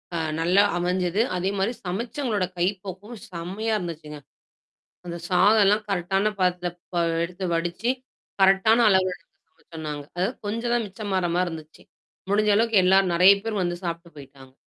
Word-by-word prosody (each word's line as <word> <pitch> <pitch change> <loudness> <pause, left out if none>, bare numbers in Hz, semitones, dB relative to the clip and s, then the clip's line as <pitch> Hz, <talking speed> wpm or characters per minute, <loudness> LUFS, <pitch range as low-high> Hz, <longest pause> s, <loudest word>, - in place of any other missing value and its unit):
அ - - 0 0.2
நல்லா 180 +5 +4
அமைஞ்சது. 180 +3 0 0.2
அதேமாரி 195 +4 -1
சமைச்சங்களோட 220 +2 -2
கைப்பக்குவம் 195 +4 -4
செம்மையா 190 +6 -3
இருந்துச்சுங்க. 155 -4 -7 0.9
அந்த 170 -1 -5
சாதல்லாம் 205 +2 +4
கரெக்ட்டான 195 +3 0
பதத்துல 180 -1 +1 0.3
ப - - -2 0.3
எடுத்து 180 +2 -6
வடிச்சு, 175 +7 -1 0.5
கரெக்ட்டான 195 +5 +5
அளவெடுத்து 185 -2 +1 0.2
சமச்சோம் 160 -2 -11
நாங்க. 145 -1 -6 0.4
கொஞ்சம் 230 +3 -2
தான் 240 -1 +1
மிச்சமாற 195 -3 -2
மாரி 180 0 +1
இருந்துச்சு. 160 -2 -10 0.5
முடிஞ்ச 210 +1 +3
அளவுக்கு 225 -2 +3
எல்லார் 190 0 +4
நெறையா 185 +4 +7
பேர் 220 -3 -2
வந்து 175 0 -1
சாப்ட்டு 170 0 -5
போய்ட்டாங்க. 135 -2 -14
185 Hz, 130 wpm, -24 LUFS, 175-205 Hz, 0.9 s, நெறையா